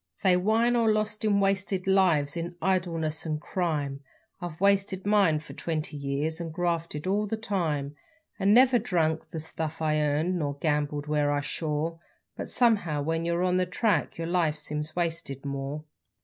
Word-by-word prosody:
_ - - -31
They 185 -2 +5
whine 220 +6 +2
o' 235 - +3
lost 215 -1 +1
an' 205 -2 +3
wasted 195 -1 0
lives 175 -7 +3
in 170 +1 -4
idleness 165 -4 0
and 155 -2 -2
crime 150 -6 -2 0.4
I've 170 -3 -6
wasted 195 -1 +2
mine 200 -6 +4
for 150 - -9
twenty 155 -2 -3
years, 145 +3 -2
and 165 -1 -5
grafted 170 -2 -2
all 205 +3 +1
the 220 - -2
time 160 -10 -2 0.4
And 195 +1 +3
never 250 +2 +6
drunk 160 -4 0
the 165 -1 -5
stuff 160 0 -5
I 155 -1 +1
earned, 155 +5 +1
nor 145 -2 -2
gambled 145 -1 -1
when 150 -1 +1
I 145 0 +1
shore 155 +2 -2 0.4
But - - -5
somehow 200 - +2
when 165 +2 -1
yer 170 +1 0
on 180 0 +2
the 185 0 +1
track 180 -2 0
yer 165 - -3
life 165 -3 +1
seems 150 +1 -4
wasted 165 -6 -2
more. 140 +2 -4
165 Hz, 175 wpm, -27 LUFS, 150-190 Hz, 0.4 s, never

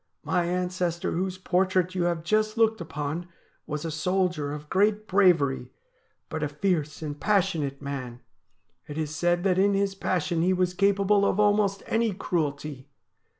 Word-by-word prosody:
My 180 -2 +1
ancestor 180 -1 -1
whose 185 +2 -2
portrait 185 0 +1
you 180 -2 0
have 170 -2 -1
just 215 +4 +1
looked 220 -3 +3
upon 155 +2 -4 0.4
was 150 +1 -4
a 165 - -2
soldier 175 -2 0
of 150 0 -7
great 210 +4 +1
bravery, 165 -10 +3 0.6
but 160 - -4
a 150 - +1
fierce 155 0 -1
and 145 -1 -5
passionate 175 -9 0
man. 130 -4 -5 0.7
It 150 - -7
is 155 -1 -3
said 175 +1 +1
that 190 -2 +2
in 200 +1 +3
his 195 0 +1
passion 180 -3 -1
he 185 +2 +3
was 180 -1 +1
capable 200 +1 +3
of 200 - +1
almost 205 -1 +2
any 225 -2 +1
cruelty. 150 -6 -3
180 Hz, 155 wpm, -26 LUFS, 150-195 Hz, 0.7 s, looked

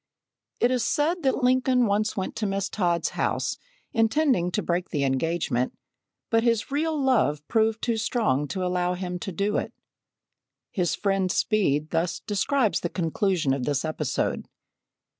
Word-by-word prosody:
It 245 - +3
is 250 -2 +1
said 330 +4 +1
that 265 -3 0
Lincoln 255 0 +3
once 210 +1 0
went 190 - -3
to 215 - -1
Miss 195 0 -1
Todd's 175 -4 0
house, - - -1 0.3
intending 225 - +2
to - - -1
break 175 +1 -1
the 145 -4 -1
engagement, 135 -2 0 0.5
but 225 0 +4
his 230 +1 +1
real 310 +2 0
love 215 - +1
proved 220 -1 +1
too 235 -2 +1
strong 210 - 0
to 185 +7 -3
allow 180 0 0
him 180 -1 -4
to 190 - -5
do 200 +4 0
it. - - -2 1.0
His 180 -4 0
friend, 195 -2 0
Speed, 155 -10 +1
thus 165 +1 0
describes 220 +3 +1
the 175 - -3
conclusion 175 -4 0
of 135 -2 -2
this 145 +1 0
episode. 150 -3 -2
195 Hz, 155 wpm, -26 LUFS, 170-230 Hz, 1.0 s, but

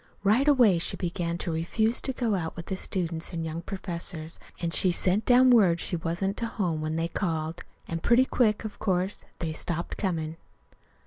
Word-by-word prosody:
Right 225 +8 +3
away 240 -11 +5
she - - -1
began 170 -1 -2
to 175 - -2
refuse 220 +8 +1
to 265 - -2
go 240 -4 -1
out 165 -4 -2
with 170 - -7
the 190 - -3
students 170 -3 -3
an' 165 -1 -3
young 160 +1 -4
professors, 170 -3 -4 0.2
an' 170 -1 -2
she 185 - +4
sent 185 +4 +1
down 255 +1 +6
word 190 -8 +5
she 175 - -1
wasn't 175 +5 -2
to 230 - -1
home 175 -8 -2
when 155 0 -2
they 165 +1 0
called. 165 -2 -2 0.2
And 165 0 -4
pretty 240 +6 +4
quick, 220 -5 +1
of 215 - -7
course, 190 -1 -1
they 160 -2 -3
stopped 170 +2 -3
comin'. 165 -5 -2
175 Hz, 190 wpm, -27 LUFS, 165-210 Hz, 0.2 s, down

